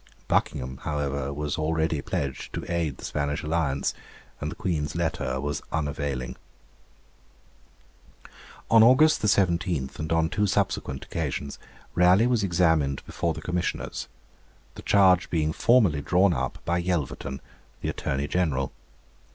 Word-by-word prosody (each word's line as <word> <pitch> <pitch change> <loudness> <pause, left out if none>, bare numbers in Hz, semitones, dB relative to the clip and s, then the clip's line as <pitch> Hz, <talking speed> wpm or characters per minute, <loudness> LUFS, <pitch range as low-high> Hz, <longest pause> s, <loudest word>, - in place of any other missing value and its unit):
Buckingham, 65 +1 0
however, 70 -2 -2
was 75 +1 -3
already 80 -1 0
pledged 70 -1 -4
to - - -4
aid 85 -5 -1
the - - -8
Spanish 75 0 -2
alliance, 75 -3 0 0.5
and 75 - -3
the - - -6
Queen's 80 -5 -2
letter 80 -6 -1
was 75 +1 -2
unavailing. 70 -5 -2 2.3
On 115 -1 +8
August 130 +7 +6
17 90 -8 +1
and 80 +1 -4
on 80 -1 +3
two 105 +5 0
subsequent 65 -7 -1
occasions 70 -3 -4 0.3
Raleigh 90 +5 +5
was 120 -4 +2
examined 80 -6 +2
before 85 -2 -2
the 75 - -7
Commissioners, 90 0 -3 0.7
the - - -10
charge 95 -3 +4
being 80 -2 0
formally 105 - +3
drawn 90 +5 +3
up 65 - -2
by 85 +1 +1
Yelverton, 80 -6 -2 0.4
the - - -2
Attorney 70 +1 -2
General. 75 -6 0
80 Hz, 125 wpm, -26 LUFS, 70-90 Hz, 2.3 s, On